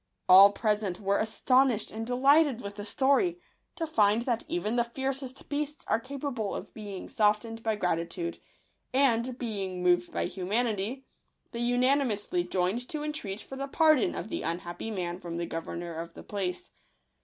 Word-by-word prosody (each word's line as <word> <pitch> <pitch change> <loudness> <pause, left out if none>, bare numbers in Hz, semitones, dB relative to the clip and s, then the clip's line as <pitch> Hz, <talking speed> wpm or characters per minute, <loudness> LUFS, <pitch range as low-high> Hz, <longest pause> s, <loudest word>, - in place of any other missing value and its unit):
All 195 +2 +9
present 210 -3 -1
were 200 0 +1
astonished 250 +1 +2
and 225 +1 -5
delighted 270 +1 +4
with 200 -3 -6
the 205 0 -6
story, 280 - +2 0.4
to 330 - -2
find 220 -7 +3
that 240 -2 -1
even 315 -9 -1
the 240 - +3
fiercest 265 +2 -5
beasts 295 +1 -3
are - - +2
capable 260 -4 -4
of - - -7
being 205 -3 -7
softened 225 -1 +1
by 220 -1 0
gratitude; 170 -2 -2 0.6
and, 250 -2 +2
being 195 -7 -4
moved 175 0 +3
by - - -1
humanity, 215 +5 -1 0.5
they 235 - -5
unanimously 250 - +1
joined 195 - -1
to 300 -1 -3
entreat 225 -10 -4
for 270 - -9
the 275 +1 -3
pardon 310 -2 +3
of - - -5
the - - -3
unhappy 175 +4 -4
man 180 -4 -3
from 170 -2 -6
the 170 - -2
governor 170 +1 -5
of 165 +1 -7
the - - -10
place. 190 -3 -4
225 Hz, 160 wpm, -29 LUFS, 195-265 Hz, 0.6 s, All